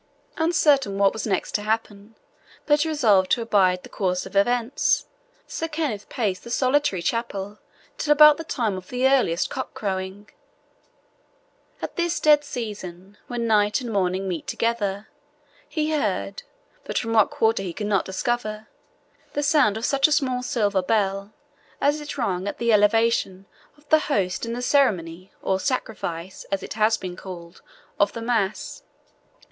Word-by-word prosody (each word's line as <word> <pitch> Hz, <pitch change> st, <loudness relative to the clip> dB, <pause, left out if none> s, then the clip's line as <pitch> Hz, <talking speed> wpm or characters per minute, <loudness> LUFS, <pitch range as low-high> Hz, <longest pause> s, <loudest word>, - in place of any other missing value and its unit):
Uncertain 295 Hz, -, +2 dB
what 200 Hz, -1 st, +3 dB
was 220 Hz, -, -4 dB
next 190 Hz, -3 st, -1 dB
to 210 Hz, -, -1 dB
happen, 215 Hz, 0 st, -3 dB, 0.5 s
but 295 Hz, +1 st, +3 dB
resolved 225 Hz, -12 st, +3 dB
to -, -, +3 dB
abide 185 Hz, -5 st, +2 dB
the -, -, -10 dB
course 185 Hz, -2 st, -1 dB
of -, -, -11 dB
events, 240 Hz, +5 st, +2 dB, 0.4 s
Sir 325 Hz, -, -4 dB
Kenneth 300 Hz, -10 st, -3 dB
paced 200 Hz, -6 st, -2 dB
the 235 Hz, -, -10 dB
solitary 255 Hz, -7 st, +1 dB
chapel 205 Hz, -2 st, -3 dB, 0.4 s
till 295 Hz, -, 0 dB
about 300 Hz, 0 st, +8 dB
the 325 Hz, -, -5 dB
time 230 Hz, -10 st, -1 dB
of 185 Hz, 0 st, -9 dB
the 250 Hz, +1 st, +2 dB
earliest 255 Hz, -11 st, +2 dB
cock 260 Hz, -, -5 dB
crowing. 190 Hz, 0 st, -4 dB, 1.6 s
At -, -, -5 dB
this 345 Hz, 0 st, 0 dB
dead 300 Hz, -1 st, +5 dB
season, 205 Hz, -7 st, -7 dB
when 240 Hz, -1 st, -3 dB
night 210 Hz, -2 st, +3 dB
and 240 Hz, -4 st, -5 dB
morning 190 Hz, 0 st, 0 dB
met 175 Hz, -4 st, -4 dB
together, 210 Hz, -3 st, -1 dB, 0.6 s
he 310 Hz, -1 st, -1 dB
heard, 210 Hz, -8 st, -1 dB, 0.4 s
but -, -, -4 dB
from 225 Hz, -1 st, -1 dB
what 220 Hz, -2 st, +5 dB
quarter 225 Hz, -2 st, +1 dB
he 185 Hz, -3 st, -4 dB
could 210 Hz, +5 st, -5 dB
not 200 Hz, -3 st, +1 dB
discover, 215 Hz, +2 st, -3 dB, 0.6 s
the 290 Hz, -, -1 dB
sound 285 Hz, -8 st, +3 dB
of 225 Hz, -, -3 dB
such 275 Hz, +1 st, +3 dB
a -, -, -5 dB
small 265 Hz, -4 st, +1 dB
silver 205 Hz, -6 st, 0 dB
bell 200 Hz, 0 st, 0 dB, 0.5 s
as 290 Hz, +2 st, +1 dB
is 295 Hz, -, -7 dB
rung 190 Hz, -6 st, -1 dB
at -, -, -4 dB
the 235 Hz, -1 st, +2 dB
elevation 210 Hz, -2 st, +2 dB, 0.3 s
of 295 Hz, 0 st, -25 dB
the 315 Hz, -, +6 dB
host 200 Hz, -8 st, -1 dB
in 230 Hz, -, -3 dB
the 245 Hz, +1 st, -4 dB
ceremony, 185 Hz, -, +1 dB
or 190 Hz, 0 st, +1 dB
sacrifice, 190 Hz, -7 st, -4 dB
as 195 Hz, -1 st, -3 dB
it -, -, -6 dB
has 215 Hz, +1 st, +2 dB
been 180 Hz, -1 st, -6 dB
called, 175 Hz, -2 st, -10 dB, 0.4 s
of 200 Hz, 0 st, +3 dB
the 230 Hz, -, -6 dB
mass. 220 Hz, -4 st, -1 dB
215 Hz, 160 wpm, -24 LUFS, 195-255 Hz, 1.6 s, about